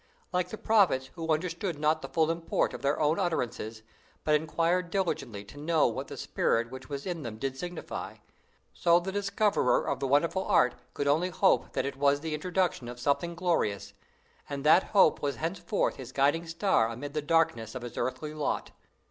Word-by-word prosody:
Like 180 0 0
the 220 - -6
prophets 190 -14 +3
who 165 -2 -3
understood 170 +2 -1
not 155 +1 +1
the - - -7
full 160 -1 +2
import 165 0 -1
of - - -7
their 140 +1 +1
own 155 +1 +2
utterances, 115 - -2 0.4
but 155 - +2
inquired 165 +3 +1
diligently 135 - -2
to 145 +8 -12
know 155 +1 +2
what 115 - -2
the - - -8
spirit 115 +1 0
which 130 +1 -9
was 140 -1 -5
in 175 -3 -3
them 115 -5 -6
did 135 +2 -3
signify, 175 +4 -6 0.6
so 170 0 +4
the 185 +2 -4
discoverer 205 +1 +1
of - - -1
the 135 - -1
wonderful 165 +7 +2
art 170 -12 +3 0.2
could 140 - -1
only 160 +6 +2
hope 190 +2 +2
that - - 0
it 140 -1 -4
was 145 0 +3
the 160 0 -3
introduction 175 -4 -1
of 120 0 -8
something 170 +6 0
glorious; 170 - -1 0.6
and 140 -1 -4
that 155 +5 +6
hope 195 -6 +4
was 140 -1 -1
thenceforth 185 +5 -1
his 130 -3 -8
guiding 145 +5 +2
star 165 - +2
amid 140 +5 -6
the 155 - -1
darkness 145 -8 +1
of 125 - -5
his 120 - -7
earthly 150 +4 -3
lot. 150 -1 -2
155 Hz, 190 wpm, -29 LUFS, 135-175 Hz, 0.6 s, that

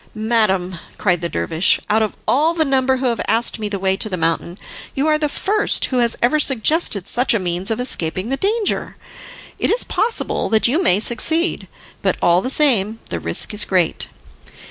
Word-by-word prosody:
"Madam," 210 -5 0 0.2
cried 180 -4 0
the 170 - -3
dervish, 165 +2 +1
"out 215 +1 +1
of 215 - -2
all 315 +6 +2
the 320 -2 +1
number 265 -1 +1
who 260 - -4
have 235 -2 -1
asked 230 0 +1
me 210 -1 -4
the 200 - -3
way 190 0 0
to 215 - +1
the 185 - -3
mountain, 165 +2 -2 0.4
you 275 - 0
are 305 -1 +2
the 300 -1 -1
first 415 +8 +1
who 255 - -3
has 235 -1 +1
ever 305 +6 +2
suggested 265 - +2
such 245 -1 +1
a - - +3
means 180 +2 -2
of 225 +1 -2
escaping 185 -4 -2
the 270 - 0
danger! 415 +6 -1 0.6
It - - 0
is 480 - +1
possible 455 +1 -2
that 220 +1 +3
you 300 +9 +1
may 200 - +3
succeed, 320 +10 0 0.3
but - - 0
all 175 +1 +3
the 255 - -3
same, 225 -8 +2
the 85 - -2
risk 85 - -1
is 210 - +3
great." 180 -4 -1
225 Hz, 195 wpm, -18 LUFS, 190-275 Hz, 0.6 s, a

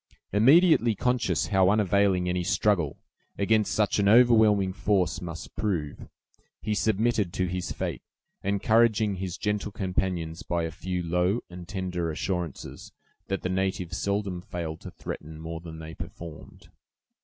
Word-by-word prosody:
Immediately 130 - +5
conscious 125 +2 +1
how 95 -3 +4
unavailing 100 -3 +2
any 90 0 0
struggle 95 -4 +1 0.4
against 110 +1 +2
such 105 -1 +1
an 100 0 +3
overwhelming 110 -5 +5
force 95 -2 0
must 85 -2 -7
prove, 85 -9 -2 0.5
he 105 - -2
submitted 110 -2 +1
to 95 - 0
his 90 0 -3
fate, - - -3 0.4
encouraging 105 +1 +2
his 90 -2 -4
gentle 105 0 -2
companions 90 -3 -2
by 85 -4 -1
a 80 - -3
few 90 0 -4
low 90 +6 +1
and 90 -1 -9
tender 90 -4 -3
assurances, 85 -1 -4 0.4
that 95 -1 -3
the 90 - -1
natives 95 -1 -1
seldom 100 -3 -2
failed 85 -3 -5
to - - -8
threaten 80 0 -8
more 80 0 -6
than 80 -1 -9
they 80 0 -8
performed. 85 -1 -10
95 Hz, 140 wpm, -27 LUFS, 90-105 Hz, 0.5 s, Immediately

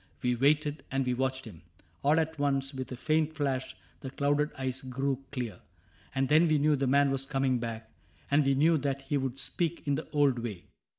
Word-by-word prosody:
We 125 0 +2
waited, 150 +4 +2
and 135 0 0
we 125 - +1
watched 130 +1 -1
him. 95 -8 -11 0.4
All 150 +3 +4
at 160 -1 -2
once. 135 -1 0
With 130 -1 -6
a - - -3
faint 155 +3 0
flash, 135 -3 -2 0.2
the 135 - -6
clouded 145 +2 +1
eyes 130 0 -3
grew 135 +1 -2
clear; 120 -9 -4 0.6
And 135 0 +1
then 155 +4 +5
we 155 -1 +3
knew 150 +1 +3
the 135 -1 0
man 140 +1 +4
was 135 0 -1
coming 135 -3 +1
back, 115 -1 -5 0.4
And 145 +1 +5
we 135 0 +2
knew 160 +3 +4
that 140 0 -2
he 145 +1 -1
would 135 -1 -2
speak 170 +4 -2
in 145 - +1
the 150 +3 -3
old 145 -5 +2
way. 110 -7 -5
135 Hz, 210 wpm, -30 LUFS, 130-145 Hz, 0.6 s, then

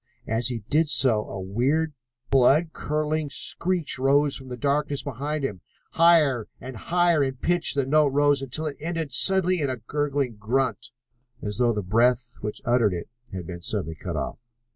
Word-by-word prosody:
As 115 +1 0
he 120 -4 -3
did 155 +2 +2
so 120 -7 +4
a 95 - -6
weird, 130 +12 0 0.4
blood 140 +5 +4
curdling 150 0 -2
screech 170 +1 -2
rose 140 +2 +3
from 130 - -6
the 125 -1 -7
darkness 145 +1 -1
behind 145 +3 -4
them. 100 -9 -4 0.3
Higher 155 -9 +4
and 130 +1 -8
higher 170 +3 +2
in 135 -1 -2
pitch 175 +5 0
the 140 -2 +1
note 150 +2 +3
rose 145 0 +2
until 135 +4 -2
it 150 -2 -4
ended 165 -2 -3
suddenly 185 +4 +4
in 140 - 0
a 130 - -3
gurgling 140 0 -2
grunt, 125 +5 -1 0.5
as 105 +1 -3
though 120 -1 +3
the 105 -3 -3
breath 115 +5 +1
which 105 0 -5
uttered 115 -5 +2
it 85 - -7 0.2
had 90 -2 -6
been 85 0 -8
suddenly 80 -1 -1
cut - - -6
off. - - -4
135 Hz, 175 wpm, -25 LUFS, 120-150 Hz, 0.5 s, so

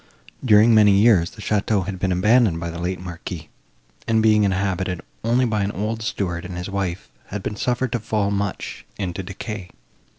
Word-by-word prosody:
During 110 -1 +6
many 105 -2 +6
years, 100 -4 +5
the 110 - -12
château 105 -2 +1
had 95 -2 -5
been 95 0 0
abandoned 105 0 +3
by 85 0 -4
the 85 - -7
late 90 +2 -2
Marquis, 85 -3 -7 0.6
and, 115 -1 +3
being 105 -1 +5
inhabited 95 -2 -1 0.2
only 120 +3 +2
by 110 -3 0
an 100 +1 0
old 110 +4 -3
steward 90 -5 -2
and 90 0 -6
his 90 +2 -5
wife, 95 -3 -3 0.2
had 100 -1 -5
been 105 - -3
suffered 125 +2 -1
to 120 - 0
fall 105 -2 -1
much 100 -1 -3
into 95 -2 -3
decay. 95 0 -7
100 Hz, 185 wpm, -22 LUFS, 90-110 Hz, 0.6 s, During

